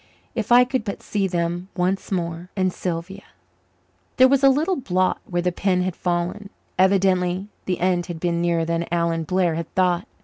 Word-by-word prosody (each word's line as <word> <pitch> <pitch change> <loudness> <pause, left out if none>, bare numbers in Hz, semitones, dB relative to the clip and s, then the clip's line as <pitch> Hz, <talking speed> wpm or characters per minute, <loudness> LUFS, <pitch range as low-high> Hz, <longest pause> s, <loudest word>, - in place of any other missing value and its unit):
If 225 -1 -3
I 245 +1 +8
could 255 -1 -2
but 200 -2 -6
see 200 -2 -1
them 175 0 -2
once 185 +2 -1
more! 170 -1 -3
And 185 -2 +1
Sylvia 180 +3 -4 1.0
There 260 - +8
was 275 +1 +2
a 275 - +8
little 315 +8 +2
blot 185 -7 0
where 175 -1 -2
the 180 - +1
pen 180 0 +1
had 185 -1 -2
fallen. 180 +3 -2 0.3
Evidently 190 0 +2 0.2
the 180 -2 -1
end 175 -1 +1
had 170 -2 -6
been 170 0 0
nearer 170 -1 +1
than 170 +1 -1
Alan 170 -1 0
Blair 180 0 +1
had 165 0 -5
thought. 180 +2 +2
180 Hz, 180 wpm, -23 LUFS, 170-195 Hz, 1.0 s, I